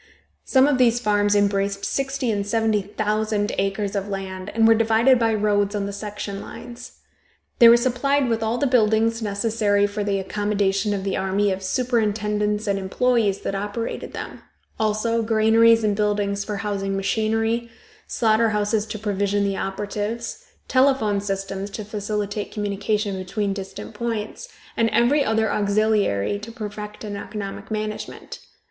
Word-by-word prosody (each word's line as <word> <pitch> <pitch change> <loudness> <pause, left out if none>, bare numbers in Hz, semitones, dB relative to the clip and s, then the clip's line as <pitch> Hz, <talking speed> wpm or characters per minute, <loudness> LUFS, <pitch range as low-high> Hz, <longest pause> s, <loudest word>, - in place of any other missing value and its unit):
Some 265 -1 +4
of 280 -3 +2
these 240 -1 +4
farms 205 -2 +2
embraced 200 0 +1
sixty 270 -3 -1
and 205 -1 -1
seventy 220 0 +1
thousand 210 +1 -1
acres 195 +1 -1
of 200 0 -2
land, 190 -1 -5
and 225 0 +5
were 225 - +7
divided 230 +3 +4
by 225 -1 +2
roads 205 -1 +1
on 200 -1 -1
the 200 - -5
section 205 -1 -5
lines. 245 0 -10 0.7
They 235 - +10
were 235 - +8
supplied 260 +3 +1
with 225 -1 0
all 225 +2 0
the 285 - +1
buildings 230 -2 +2
necessary 205 -1 +1
for 205 +1 -3
the 200 -1 0
accommodation 205 +1 0
of 195 - -4
the 195 - -1
army 195 +1 +1
of 190 0 -3
superintendents 210 -1 0
and 200 -2 0
employes 210 +1 +1
that - - -3
operated 205 +3 -4
them; - - -7 0.4
also, 220 +2 +1
granaries 225 +1 +4
and 210 -1 +2
buildings 205 -1 0
for 210 0 -4
housing 200 -1 -2
machinery, 225 +3 0 0.4
slaughter 225 0 +2
houses 210 0 0
to 215 - -5
provision 205 -1 0
the 195 -1 -1
operatives, 210 - -4 0.2
telephone 255 -7 +2
systems 195 0 -4
to 210 +1 -6
facilitate 210 0 -3
communication 205 -1 -2
between 195 +2 -2
distant 195 +2 -7
points, 230 - -4 0.3
and 225 0 +2
every 240 +6 +3
other 220 -2 +1
auxiliary 205 - +1
to 215 +3 -8
perfect 210 -2 -7
an 205 -1 -5
economic 200 -1 -6
management. 215 -1 -5
210 Hz, 150 wpm, -23 LUFS, 200-225 Hz, 0.7 s, They